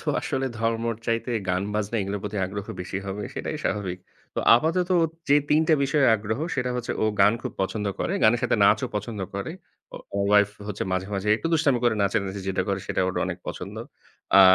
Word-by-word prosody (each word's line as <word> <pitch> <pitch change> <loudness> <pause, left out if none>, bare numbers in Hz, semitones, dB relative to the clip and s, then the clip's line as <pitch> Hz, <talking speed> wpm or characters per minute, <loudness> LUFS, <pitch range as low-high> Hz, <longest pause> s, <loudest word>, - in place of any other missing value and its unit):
থো - - -6
আসলে 135 0 -1
ধর্মর 115 +1 0
চাইতে 115 +1 0 0.2
গান-বাজনা 100 +4 -1
এগুলোর 100 +1 -3
প্রতি 105 0 -4
আগ্রহ 100 +1 -6
বেশি 95 +1 -4
হবে, 100 +2 -4
সেটাই - - -3
স্বাভাবিক। 95 -3 -2 0.4
তো - - 0 0.2
আপাতত 165 +7 +1
ও - - +4 0.3
যে 145 - +6
৩ 150 - +5
টা 160 - +6
বিষয়ে 140 0 +3
আগ্রহ, 110 +2 -3 0.2
সেটা 125 -1 -1
হচ্ছে 125 -1 -2
ও - - +4 0.2
গান 100 +2 +7
খুব - - -4
পছন্দ 105 +2 -2
করে। - - -1
গানের 120 +2 +5
সাথে 125 - +2
নাচও 105 +1 +4
পছন্দ 105 0 -4
করে। 100 +11 -3 0.4
ও - - -6 0.2
আমার 100 0 0
ওয়াইফ 105 0 +5 0.2
হচ্ছে 105 -1 -3
মাঝে, 95 0 -1
মাঝে 100 +2 -2
একটু 165 - -4
দুষ্টামি 145 -6 +3
করে 120 -2 +4
নাচানাচি 100 0 -1
যেটা 95 - 0
করে 100 -1 0
সেটা - - -1
ওর 95 - -3
অনেক - - -4
পছন্দ। - - -6 0.6
আ - - +10
105 Hz, 200 wpm, -25 LUFS, 100-120 Hz, 0.6 s, আ